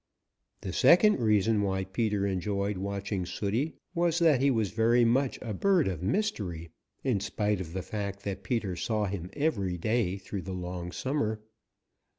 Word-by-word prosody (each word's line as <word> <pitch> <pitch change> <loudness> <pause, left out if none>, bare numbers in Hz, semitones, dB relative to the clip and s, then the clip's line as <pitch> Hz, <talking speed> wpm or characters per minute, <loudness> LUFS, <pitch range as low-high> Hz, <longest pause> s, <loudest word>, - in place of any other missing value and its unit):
The 95 - -5
second 175 - +6
reason 105 -1 +3
why 95 -1 0
Peter 100 +1 -1
enjoyed 100 +1 -1
watching 100 0 -3
Sooty 105 - -2 0.2
was 170 -1 +1
that 160 -7 +4
he 140 - +4
was 110 -7 +1
very 115 +2 +3
much 130 +3 +2
a 115 -4 -4
bird 185 - +3
of 90 -4 -3
mystery, 95 - -2 0.3
in 125 -7 +1
spite 105 0 -1
of 85 -2 -7
the 95 0 -3
fact 100 -2 -4
that 100 -1 -4
Peter 100 -2 -2
saw 105 +4 -1
him 95 -3 -4
every 100 - 0
day 110 0 0
through 95 0 -6
the 95 - -6
long 90 -1 -5
summer. 110 -4 -2
105 Hz, 165 wpm, -29 LUFS, 95-120 Hz, 0.3 s, second